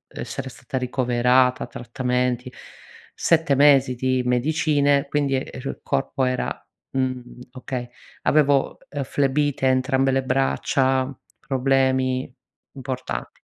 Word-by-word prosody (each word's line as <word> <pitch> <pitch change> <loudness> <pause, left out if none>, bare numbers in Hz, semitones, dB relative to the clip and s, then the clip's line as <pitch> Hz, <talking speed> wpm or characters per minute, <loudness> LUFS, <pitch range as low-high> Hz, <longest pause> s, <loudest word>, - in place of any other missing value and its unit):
essere 135 -1 -5
stata 130 - -6
ricoverata, 125 0 +2
trattamenti, 125 +1 -2 0.6
7 160 -4 +2
mesi 135 -2 +5
di 130 +1 0
medicine 145 +2 +2
quindi, 140 -2 +1
ehm, 130 - -3
il 135 - -5
corpo 130 - -1
era 125 0 -1 0.4
mhmm, 130 -1 -1 0.3
okay 125 -1 -5 0.3
avevo, 145 -2 +3
ehm, 145 -1 -3
flebite 140 +1 0
a - - +5
entrambe 130 +1 +2
le 135 0 +1
braccia, 130 0 +1 0.3
problemi 130 -1 +1 0.4
importanti. 130 -2 -5
130 Hz, 105 wpm, -23 LUFS, 125-140 Hz, 0.6 s, mesi